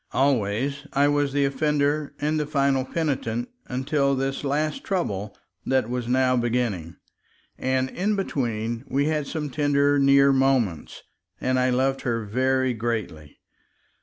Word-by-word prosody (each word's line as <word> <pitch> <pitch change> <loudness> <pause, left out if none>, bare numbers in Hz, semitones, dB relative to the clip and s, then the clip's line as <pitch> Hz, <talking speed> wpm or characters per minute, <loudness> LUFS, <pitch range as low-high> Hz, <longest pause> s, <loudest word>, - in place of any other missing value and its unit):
Always 135 +1 0
I 140 +1 +4
was 145 -1 +1
the 140 0 +2
offender 145 +1 0
and 150 +1 0
the 150 - -2
final 140 -2 +1
penitent 130 -6 -2 0.2
until 140 +2 0
this 135 +1 -2
last 155 - -1
trouble 105 - -2 0.3
that 130 -3 0
was 125 -1 -2
now 130 +1 +3
beginning; 120 -9 -1 0.6
and 130 0 0
in 205 +4 0
between 120 - -2
we 140 +2 +1
had 150 -2 -1
some 150 -3 -4
tender 145 0 +2
near 140 0 +5
moments, 130 - 0 0.4
and 130 0 +1
I 130 0 +2
loved 135 +2 +1
her 115 -3 -2
very 130 +3 +1
greatly. 110 -10 -4
135 Hz, 135 wpm, -24 LUFS, 120-145 Hz, 0.6 s, near